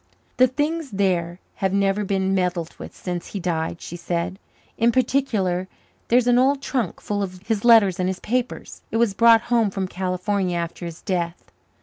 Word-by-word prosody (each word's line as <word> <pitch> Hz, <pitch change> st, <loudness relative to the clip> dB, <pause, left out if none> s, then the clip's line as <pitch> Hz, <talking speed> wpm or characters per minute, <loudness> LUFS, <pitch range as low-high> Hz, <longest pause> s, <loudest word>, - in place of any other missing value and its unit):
"The 255 Hz, 0 st, +6 dB
things 295 Hz, +4 st, -2 dB
there 180 Hz, -4 st, 0 dB, 0.2 s
have 190 Hz, -1 st, 0 dB
never 200 Hz, +1 st, +2 dB
been 190 Hz, -1 st, 0 dB
meddled 180 Hz, -3 st, -1 dB
with -, -, -9 dB
since 175 Hz, -2 st, -5 dB
he 200 Hz, -, -2 dB
died," 170 Hz, -2 st, -2 dB
she 175 Hz, -, -7 dB
said. 175 Hz, +2 st, -3 dB, 0.4 s
"In 235 Hz, +1 st, +3 dB
particular, 220 Hz, -8 st, +1 dB, 0.4 s
there's 245 Hz, +1 st, +4 dB
an 245 Hz, 0 st, +4 dB
old 270 Hz, +2 st, +3 dB
trunk 265 Hz, -4 st, -2 dB
full 205 Hz, -1 st, -2 dB
of 185 Hz, -1 st, -5 dB
his 220 Hz, -3 st, 0 dB
letters 215 Hz, -6 st, +6 dB
and 185 Hz, 0 st, +1 dB
his 190 Hz, -, -3 dB
papers. 250 Hz, +3 st, -3 dB
It -, -, -1 dB
was 230 Hz, -3 st, +2 dB
brought 230 Hz, +1 st, +6 dB
home 235 Hz, -3 st, +2 dB
from 190 Hz, -1 st, -3 dB
California 185 Hz, 0 st, -1 dB
after 170 Hz, +1 st, -4 dB
his 165 Hz, 0 st, -10 dB
death. 175 Hz, -2 st, -3 dB
195 Hz, 180 wpm, -23 LUFS, 180-235 Hz, 0.4 s, The